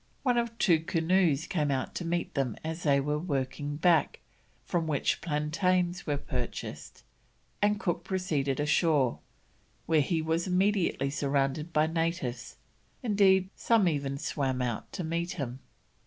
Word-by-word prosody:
One 245 -3 +3
or 235 - 0
two 205 -8 +2
canoes 165 -1 +2
came 150 -5 -1
out 135 -2 -1
to 175 - -4
meet 170 +1 -2
them 135 -6 -1
as 160 +2 -4
they 140 -4 +3
were 150 +2 -1
working 145 -2 -2
back, 165 -1 +2 0.5
from 165 -2 -1
which 145 -3 0
plantains 175 +4 0
were 145 -1 +1
purchased, 125 -4 -6 0.6
and 205 0 +2
Cook 175 -4 -1
proceeded 150 -8 -1
ashore, 150 -3 +2 0.7
where 160 -2 +3
he 160 +4 0
was 160 +3 0
immediately 185 -7 +1
surrounded 140 +2 0
by 155 -1 +3
natives; 160 -7 -2 0.5
indeed, 195 -4 +3
some 225 -5 +3
even 140 -4 -1
swam 135 -3 -2
out 120 -3 -3
to 185 - -3
meet 170 +2 -2
him. 130 -5 -5
160 Hz, 140 wpm, -29 LUFS, 140-180 Hz, 0.7 s, One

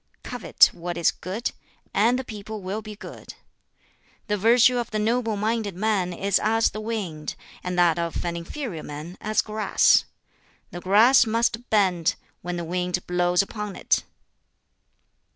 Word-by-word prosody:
Covet 245 -3 +3
what 175 0 -5
is 170 - +3
good, 200 +7 -4 0.4
and 230 +5 +3
the 260 - -3
people 215 -2 -8
will 195 +4 -3
be 215 -1 -9
good. - - -11 0.9
The 210 - 0
virtue 240 +4 +4
of 240 - -3
the 215 - -3
noble 225 0 0
minded 215 -2 -1
man 195 -2 0
is 195 +2 +1
as 225 +1 +2
the 215 - -6
wind, 200 -9 -4 0.3
and 180 0 -3
that 175 -1 +4
of 170 +1 -3
inferior 170 - -4
men 150 +5 -8
as 215 +1 +1
grass; 215 -2 +3 0.7
the 175 - -7
grass 225 +7 +5
must 230 +2 0
bend, 180 -6 +2 0.3
when 175 0 -4
the 170 - -3
wind 180 +1 -2
blows 180 +1 +2
upon 210 -1 -6
it." - - +1
205 Hz, 150 wpm, -24 LUFS, 180-220 Hz, 0.9 s, grass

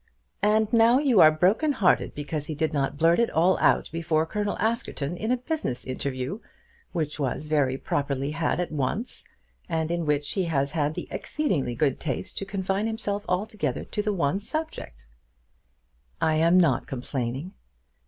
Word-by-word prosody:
"And 215 +1 +2
now 230 +2 +6
you 265 -7 +3
are 155 - +9
broken 195 - +2
hearted 200 -8 +2
because 145 0 -4
he 155 - -4
did 160 +1 -1
not 140 -1 -1
blurt 165 +4 +4
it 235 - +3
all 175 +4 +3
out - - +3
before 160 -1 0
Colonel 205 +4 -2
Askerton 210 -9 -1
in 220 +5 -3
a 255 - +3
business 250 - -3
interview, 130 - -3 0.5
which 155 -4 -3
was 140 +2 -2
very 145 -4 +1
properly 140 0 -2
had 165 +2 -1
at 180 - -2
once, 155 - -2 0.4
and 160 0 -1
in 170 -2 -1
which 145 -1 0
he 190 -3 0
has 140 -4 0
had 150 -1 0
the - - -5
exceeding 190 - -1
good 135 +1 +1
taste 135 -6 -4
to 195 - -4
confine 195 +1 -1
himself 205 -2 -2
altogether 180 - -1
to 210 - -3
the 210 0 0
one 170 -2 0
subject." 215 - -5 1.1
"I 160 - +2
am 170 +3 +5
not 170 - +2
complaining." 130 +4 -4
165 Hz, 165 wpm, -26 LUFS, 145-205 Hz, 1.1 s, are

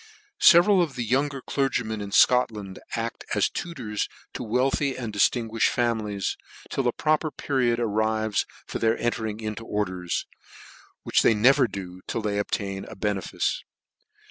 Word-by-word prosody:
Several 180 +2 +7
of 155 -6 -1
the 125 - -2
younger 135 +4 0
clergymen 125 -6 -1
in 100 -1 -6
Scotland 105 -5 +3 0.2
aft 115 0 -4
as - - +2
tutors 120 -11 -4 0.2
to - - -5
wealthy 130 +4 0
and 115 -4 -5
diftinguimed 115 +2 +1
families, 110 -5 0 0.3
till 135 -2 0
a - - +3
proper 155 +4 +1
period 125 -5 0
arrives 110 -1 0 0.2
for - - -5
their 115 0 +2
entering 110 -2 -2
into 110 0 -5
orders, 95 -5 -2 0.8
which - - +3
they 115 - +4
never 130 +4 +5
do 95 -3 -8
till 115 - -3
they 100 -1 0
obtain 100 -1 -2
a - - -10
benefice. 100 -2 -2
115 Hz, 145 wpm, -25 LUFS, 105-130 Hz, 0.8 s, Several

